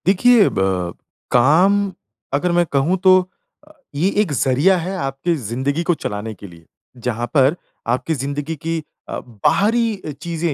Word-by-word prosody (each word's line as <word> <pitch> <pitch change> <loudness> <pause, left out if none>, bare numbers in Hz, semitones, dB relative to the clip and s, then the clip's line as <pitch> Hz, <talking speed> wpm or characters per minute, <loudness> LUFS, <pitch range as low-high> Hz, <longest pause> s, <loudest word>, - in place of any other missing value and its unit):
देखिए 210 +4 +5
ब 95 -2 -1 0.4
काम 155 +11 +5 0.6
अगर 175 +5 +1
मैं 175 0 +3
कहूँ 145 +7 +2
तो 190 - +7 0.8
ये 165 +7 +2
एक 195 -7 -1
ज़रिया 140 +8 +3
है 180 +3 -3
आपकी 135 +2 -1
ज़िंदगी 135 +5 -2
को 175 - +2
चलाने 110 -6 -5
के 100 - -11
लिए, 85 -2 -16 0.3
जहाँ 120 0 -3
पर 140 +1 +4 0.3
आपकी 125 +7 0
ज़िंदगी 140 +3 -3
की 165 +2 -3 0.3
अ, - - -3
बाहरी 205 - 0
चीज़ें 170 0 -2
145 Hz, 140 wpm, -19 LUFS, 125-180 Hz, 0.8 s, तो